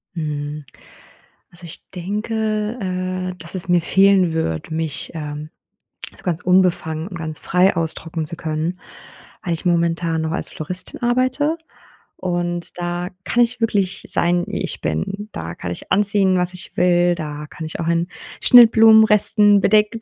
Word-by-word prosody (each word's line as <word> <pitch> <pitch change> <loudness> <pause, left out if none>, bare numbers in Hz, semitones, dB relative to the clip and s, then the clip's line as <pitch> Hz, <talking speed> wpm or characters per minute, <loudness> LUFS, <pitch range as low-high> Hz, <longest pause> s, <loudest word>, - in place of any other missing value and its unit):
Mhm. 150 -2 -4 0.9
Also 175 0 -14
ich 165 - -11
denke, 215 +4 -3 0.5
äh, - - -11
dass 170 +3 -6
es 185 0 +3
mir 175 -1 +4
fehlen 190 -1 +3
würde, 160 - -3
mich, 160 -2 -4
ähm, 150 0 -6 0.7
so - - -17
ganz 175 -2 -2
unbefangen 175 -3 +1
und 180 - -9
ganz 155 -1 -5
frei 180 +1 +2
ausdrücken 165 0 -2
zu 170 - -4
können, 160 +3 -3 0.6
weil 175 - -2
ich 165 - -5
momentan 170 -1 0
noch 160 0 -2
als - - -1
Floristin 180 +4 -4
arbeite 255 +6 +1 0.6
und 175 -1 -2
da 175 +1 -3 0.2
kann 240 - +2
ich 245 +1 -5
wirklich 200 -4 0
sein, 175 0 +2
wie - - -4
ich - - -4
bin, 195 - -3
da 80 +1 -6
kann 90 - -6
ich - - -6
anziehen, 200 -1 +4
was 180 0 0
ich 180 - -7
will, 175 0 +3
da 150 -2 -6
kann 160 - -9
ich 155 - -7
auch 165 - -3
in 170 +1 0 0.3
Schnittblumenresten 220 -3 +6
bedeckt 215 +2 +2
175 Hz, 155 wpm, -20 LUFS, 160-200 Hz, 0.9 s, Schnittblumenresten